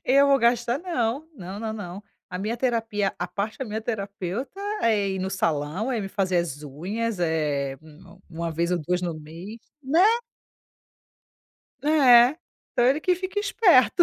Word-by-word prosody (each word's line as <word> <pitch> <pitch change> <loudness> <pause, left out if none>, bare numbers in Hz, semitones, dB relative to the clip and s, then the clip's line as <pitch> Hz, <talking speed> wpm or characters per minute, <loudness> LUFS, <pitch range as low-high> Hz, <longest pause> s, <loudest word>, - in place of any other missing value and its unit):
Eu 275 +2 +5
vou 275 -1 +5
gastar 235 +2 +2
não. 310 -4 -2
Não, 190 -2 -7
não, 220 -1 -3
não. 200 -2 -7 0.3
A 180 - -4
minha 215 +4 -2
terapia, 225 -5 0
a 175 - -2
parte 200 +5 -4
da 265 - -3
minha 220 0 -4
terapeuta, 205 - -4 0.2
é 210 -3 +2
ir 190 - -2
no 190 +1 -2
salão, 165 - -1
é 240 - 0
ir 195 - -3
fazer 190 -3 0
as 155 -4 -3
unhas, 195 +10 -3
eh, 150 -5 0
1-, 155 +4 -16
1 170 0 -4
vez 170 +2 0
ou 180 - +1
2 180 +3 -1
no 175 -2 -2
mês. 165 +8 -9 0.2
Né? 315 +7 +4 1.8
É, 270 -3 +6 0.4
então 240 - +2
ele 275 +4 +3
que 365 +3 +2
fica 375 +3 -4
esperto. 365 - +4
210 Hz, 165 wpm, -25 LUFS, 175-250 Hz, 1.8 s, É